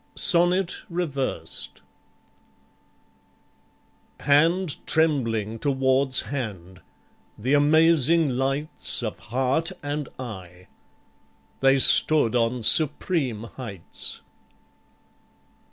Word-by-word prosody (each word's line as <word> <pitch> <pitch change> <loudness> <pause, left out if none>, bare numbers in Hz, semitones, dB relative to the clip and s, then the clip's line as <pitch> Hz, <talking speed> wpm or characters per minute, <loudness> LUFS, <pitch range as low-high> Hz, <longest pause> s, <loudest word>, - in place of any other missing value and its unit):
Sonnet 175 0 +2
Reversed 140 - -4 2.4
Hand 160 +3 +2
trembling 115 -9 0
towards 130 -1 +1
hand; 95 -9 -7 0.6
the 125 +6 -2
amazing 160 +1 +3
lights 135 +4 -1
Of - - -5
heart 135 - 0
and 145 -1 -4
eye. 90 -7 -10 0.9
They 135 0 +3
stood 135 -2 +4
on 120 0 -1
supreme 145 - +2
heights. 115 -6 -6
135 Hz, 70 wpm, -24 LUFS, 115-155 Hz, 2.4 s, stood